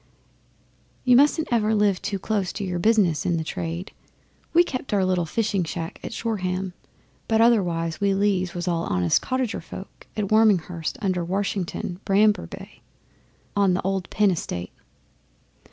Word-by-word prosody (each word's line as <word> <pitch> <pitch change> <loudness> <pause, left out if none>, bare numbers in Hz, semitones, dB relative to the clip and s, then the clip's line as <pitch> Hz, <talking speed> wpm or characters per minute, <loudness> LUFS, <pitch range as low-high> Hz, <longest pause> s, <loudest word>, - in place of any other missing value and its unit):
'You 250 -1 +6
mustn't 295 +4 +4
ever 220 -2 +2
live 205 -3 +2
too 200 0 -2
close 195 -1 -1
to 205 - -4
your 180 -2 -2
business 185 -7 +3
in 175 -2 +1
our 160 - -2
trade. 165 +3 -4 0.6
We 345 +1 +6
kept 255 -8 -3
our 195 -2 +2
little 180 -2 +1
fishing 210 -1 0
smack 165 0 -5
at - - -5
Shoreham, 190 -5 -2 0.5
but 220 -1 +2
otherwise 175 -8 +2
we 200 -1 +2
Lees 195 -2 +1
was 175 0 -3
all 170 -1 0
honest 90 -3 +2
cottager 255 -3 -2
folk - - -11
at 205 -2 -1
Warminghurst 180 -7 +2
under 185 -3 0
Washington 185 -1 -2
Bramber 210 +2 +3
way - - -11 0.7
on 195 -3 +3
the 185 - -1
old 190 0 -2
Penn 205 -2 +3
estate. 90 - -4
195 Hz, 155 wpm, -24 LUFS, 175-215 Hz, 0.7 s, You